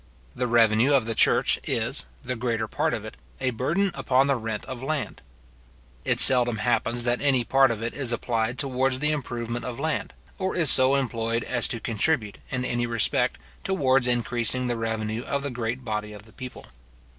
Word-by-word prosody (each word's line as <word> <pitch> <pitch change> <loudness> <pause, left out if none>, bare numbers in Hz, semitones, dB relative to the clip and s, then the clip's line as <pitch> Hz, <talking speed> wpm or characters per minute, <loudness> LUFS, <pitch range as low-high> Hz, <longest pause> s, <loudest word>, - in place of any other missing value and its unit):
The 125 0 -1
revenue 115 +3 +4
of 130 -5 +2
the 115 - -2
church - - +3
is, 115 +5 -2 0.2
the 125 -1 -3
greater 115 -2 -2
part - - 0
of - - -7
it, - - -9 0.2
a 130 - 0
burden 170 - 0
upon 130 0 +2
the 140 0 +2
rent 110 -3 -4
of 130 -2 -7
land. 145 0 -3 0.8
It - - 0
seldom 120 -3 +7
happens 120 +1 0
that 120 0 0
any 135 -4 +2
part 135 +2 +4
of 115 -1 -3
it 115 - -3
is 135 -4 -1
applied 120 0 -1
towards 130 -1 0
the 150 +3 +1
improvement 120 -5 -4
of 125 0 -6
land; 160 +2 -2 0.3
or 190 0 -1
is 165 -6 +4
so 130 +1 +5
employed 115 -3 -1
as 120 -2 0
to 115 - -4
contribute, 110 0 -1
in 130 -1 -2
any 120 -1 -1
respect, 115 -2 0 0.3
towards 135 -8 +2
increasing 120 +1 0
the 120 -1 -1
revenue 110 0 -2
of 140 +2 -3
the 140 - -3
great 125 +1 -4
body 105 -1 -3
of 105 -1 -11
the 110 - -19
people. 130 -2 -9
120 Hz, 190 wpm, -25 LUFS, 115-135 Hz, 0.8 s, seldom